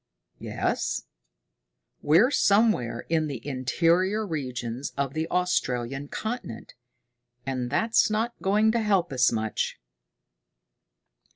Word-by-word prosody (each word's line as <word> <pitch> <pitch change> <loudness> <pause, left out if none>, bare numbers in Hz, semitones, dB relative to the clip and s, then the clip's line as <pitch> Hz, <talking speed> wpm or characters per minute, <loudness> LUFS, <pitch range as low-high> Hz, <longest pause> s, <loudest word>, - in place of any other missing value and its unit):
"Yes?" - - -2 1.0
"We're 175 - +4
somewhere 200 - +2
in 160 -2 +1
the 135 -5 -6
interior 170 - +1
regions 130 - -4
of 140 -1 -1
the 160 +1 -2
Australian 135 -7 -1
continent 220 - -6 0.7
and 130 -2 -2
that's 225 - +2
not 225 +3 -1
going 210 +3 +3
to 235 - +1
help 195 -8 +1
us 125 -1 +4
much." 110 -1 -2
155 Hz, 100 wpm, -26 LUFS, 130-210 Hz, 1.0 s, We're